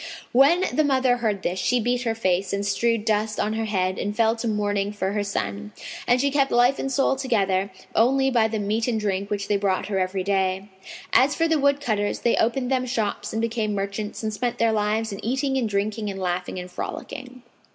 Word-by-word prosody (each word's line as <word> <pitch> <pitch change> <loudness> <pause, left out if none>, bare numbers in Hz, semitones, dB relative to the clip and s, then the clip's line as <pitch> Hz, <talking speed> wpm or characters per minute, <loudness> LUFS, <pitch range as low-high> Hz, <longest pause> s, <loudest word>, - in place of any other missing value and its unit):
When 305 +9 +5
the 310 - +3
mother 260 -3 +2
heard 215 -5 -1
this, 180 +2 -1
she 245 +6 +2
beat 245 +2 0
her 225 -1 0
face 190 -3 0
and 200 0 -1
strewed 225 +2 +1
dust 215 0 0
on 215 - 0
her 225 0 -1
head 185 -3 -1
and 205 +1 -2
fell 225 0 +3
to 230 - -3
mourning 205 -2 0
for 195 -2 -2
her 205 0 -1
son; 100 - -4 0.3
and 245 +1 +4
she 280 +2 +1
kept 275 -1 +2
life 245 +3 +3
and 270 - -2
soul 270 0 +2
together 200 -7 0 0.2
only 265 +4 +3
by 230 -3 +3
the 220 0 -3
meat 215 +3 -1
and 230 -3 0
drink 200 -1 -2
which 200 -1 -2
they 205 -1 +2
brought 195 0 -1
her 195 -2 0
every 185 0 -1
day. 190 0 0 0.4
As 275 +3 +5
for 330 - +2
the 320 -2 +2
woodcutters 275 -8 +1
they 235 - +3
opened 250 +3 +1
them 255 -1 +1
shops 225 -5 -2
and 225 +1 -2
became 225 -2 -1
merchants 200 +2 -4
and 215 0 -2
spent 240 +3 -2
their 230 -1 +3
lives 215 +1 0
in 200 - -7
eating 265 +3 0
and 245 -4 0
drinking 210 +1 -1
and 195 -1 -5
laughing 180 0 -2
and 180 0 -7
frolicking. 255 +7 -7
215 Hz, 215 wpm, -24 LUFS, 200-245 Hz, 0.4 s, When